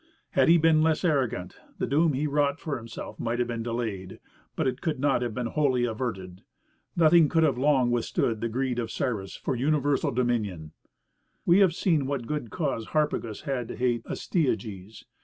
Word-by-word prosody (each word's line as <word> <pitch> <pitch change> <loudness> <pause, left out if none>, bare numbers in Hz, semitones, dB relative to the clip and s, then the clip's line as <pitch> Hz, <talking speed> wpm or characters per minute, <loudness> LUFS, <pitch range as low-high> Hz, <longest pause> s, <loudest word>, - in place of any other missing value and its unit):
Had - - +3
he 170 - +7
been 160 -1 +4
less 160 +2 +1
arrogant, 125 - 0 0.2
the - - -1
doom 150 +4 +2
he 140 +3 -1
wrought 145 0 +1
for 155 -4 -3
himself 115 -1 -8
might 115 0 -1
have 120 -1 0
been 115 -1 -3
delayed, 110 -5 -4 0.4
but - - -1
it 130 0 -1
could 160 -5 -2
not 140 -2 +2
have 120 -3 -3
been 125 - -2
wholly 130 -1 +1
averted. 105 -6 -4 0.5
Nothing 165 -2 +5
could 165 -1 +3
have 145 -5 +3
long 130 -3 +3
withstood 115 -2 0
the 115 - -1
greed 125 +1 -1
of 115 -2 -3
Cyrus 110 -6 -3
for - - -3
universal 145 +2 +1
dominion. 110 -10 -1 0.7
We 175 +3 +5
have 185 -5 +4
seen 160 -8 +1
what 135 -4 -2
good 150 -3 -3
cause 135 -8 -2
Harpagus 150 -8 -1
had 135 -6 -3
to - - -6
hate 120 -2 0
Astyages. 110 - -3
125 Hz, 180 wpm, -27 LUFS, 115-150 Hz, 0.7 s, he